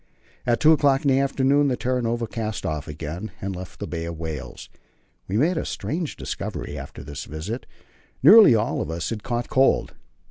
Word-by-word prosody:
At 120 -1 +2
two 155 - +6
o'clock 145 -2 +3
in - - +4
the 135 - +4
afternoon 140 +1 +2
the 125 -3 0
Terra 125 0 -1
Nova 115 0 -1
cast 110 -1 -4
off 75 -1 -3
again, 80 +6 -6
and 95 0 -4
left 90 0 -9
the - - -3
Bay 85 -1 -4
of 85 -1 -5
Whales. 80 -2 -6 0.6
We 100 - -1
made 160 +8 +2
a - - -1
strange 165 0 -3
discovery 70 - -5
after 70 -2 -8
this 70 -1 -7
visit. 90 - -6 0.6
Nearly 195 - +9
all 110 0 0
of - - -4
us 85 +5 -3
had 110 -2 -4
caught 120 0 -3
cold. 135 +1 +3
115 Hz, 190 wpm, -24 LUFS, 85-135 Hz, 0.6 s, Nearly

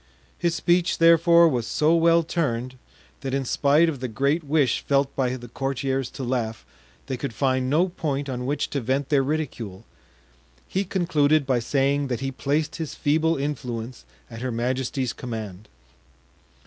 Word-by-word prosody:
His 170 -1 0
speech, 175 +3 +2
therefore, 170 0 +6
was 120 -7 -1
so 155 +2 +2
well 165 0 +4
turned, 130 -7 -2 0.5
that 135 -1 -3
in 135 -1 -1
spite 145 +6 +3
of 150 -5 -2
the 130 - -3
great 140 +8 0
wish 145 -4 +2
felt 140 -1 +1
by 130 -2 0
the 120 -1 -9
courtiers 135 +1 -2
to 135 - -6
laugh, 120 -3 -2 0.4
they 130 - -3
could 125 -2 -5
find 130 0 +1
no 165 +6 +3
point 145 -5 -3
on 125 -1 -4
which 145 +2 -1
to 140 - -1
vent 130 +4 -1
their 145 -2 +4
ridicule. 120 -9 -4 0.8
He 195 +2 -1
concluded 155 -6 +2
by 130 -2 +1
saying 140 +3 +1
that 125 -3 -2
he 135 0 -2
placed 150 +4 -1
his 160 -3 -5
feeble 160 +2 +1
influence 125 -4 -4 0.2
at 115 -1 -9
her 130 0 -2
majesty's 125 +2 -1
command. 110 -5 -7
135 Hz, 160 wpm, -24 LUFS, 125-155 Hz, 0.8 s, therefore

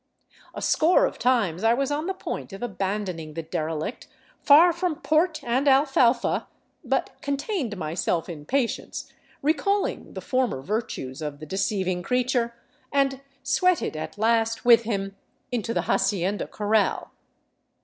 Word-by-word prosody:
A - - -5
score 365 +11 +4
of - - -4
times 215 -8 +1
I 225 +1 +4
was 275 +2 -1
on 300 +3 -1
the 380 - -2
point 375 - -6
of 195 - -7
abandoning 190 -7 -3
the 165 - -4
derelict 160 +5 -4 0.3
far 330 +5 +7
from 345 -1 -1
port 315 +2 +1
and 255 +4 0
alfalfa, 265 -3 +3 0.4
but - - 0
contained 280 - -2
myself 165 0 -1
in 150 -4 -8
patience, 265 -4 -2 0.3
recalling 330 +7 0
the - - -3
former 255 - -1
virtues 180 - -4
of 150 -2 -4
the 155 - -9
deceiving 190 0 -1
creature, 245 +2 0 0.4
and 275 -1 +1 0.2
sweated 365 - +1
at 155 +5 -6
last 225 +1 +1
with 235 -1 +7
him 195 -3 -2 0.4
into 230 -2 -2
the - - 0
hacienda 195 0 0
corral. 210 0 0
230 Hz, 140 wpm, -25 LUFS, 190-275 Hz, 0.4 s, far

